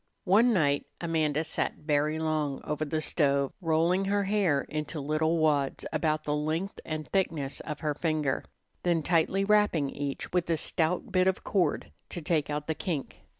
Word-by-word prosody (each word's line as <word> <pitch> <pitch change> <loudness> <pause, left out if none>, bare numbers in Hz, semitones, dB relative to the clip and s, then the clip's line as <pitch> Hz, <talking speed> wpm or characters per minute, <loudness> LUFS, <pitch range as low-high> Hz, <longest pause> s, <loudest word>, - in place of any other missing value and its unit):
One 215 +6 +5
night 145 -8 +2
Amanda 160 -3 0
sat - - -1
very 150 0 0
long 155 -3 -1
over 150 +1 -2
the 155 +1 -1
stove 140 -3 +1
rolling 170 +3 +2
her 200 +1 +1
hair 190 -8 +2
into 150 +2 -4
little 155 +3 +1
wads 145 -4 +1
about 155 0 0
the 150 - -1
length 160 +6 -2
and 155 -1 -4
thickness 160 -8 -1
of 150 -2 -6
her 150 -2 0
finger, 150 -3 -1 0.4
then 170 -3 +1
tightly 175 +4 +2
wrapping 205 -9 +3
each 140 +2 -5
with 175 -2 +1
a 165 - +2
stout 175 +9 -1
bit 185 -1 +3
of 190 - 0
cord 190 -4 0 0.2
to - - -5
take 155 -2 +1
out 150 0 -2
the 160 - -1
kink. 155 -4 -4
155 Hz, 170 wpm, -29 LUFS, 150-175 Hz, 0.4 s, One